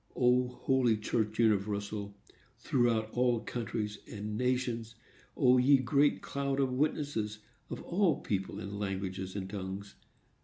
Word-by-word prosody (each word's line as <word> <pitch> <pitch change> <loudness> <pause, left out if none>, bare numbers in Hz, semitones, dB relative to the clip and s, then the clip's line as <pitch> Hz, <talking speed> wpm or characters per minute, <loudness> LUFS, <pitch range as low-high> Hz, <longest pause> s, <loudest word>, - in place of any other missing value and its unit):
O, 125 0 +4
holy 125 -2 +1
church 110 0 -1
universal, 100 -2 0 0.4
throughout 115 -3 +1
all 120 -1 +2
countries 110 -3 -3
and 105 0 -4
nations! 120 -1 -1 0.4
O, 125 -2 +5
ye 135 +3 +6
great 140 +3 +2
cloud 140 0 -2
of 135 -2 +2
witnesses, 135 -6 -1 0.3
of - - -6
all 175 -3 +2
people 95 -2 -2
and 100 +1 -6
languages 95 -1 -3
and 95 -2 -3
tongues! 100 0 -6
115 Hz, 125 wpm, -32 LUFS, 100-125 Hz, 0.4 s, ye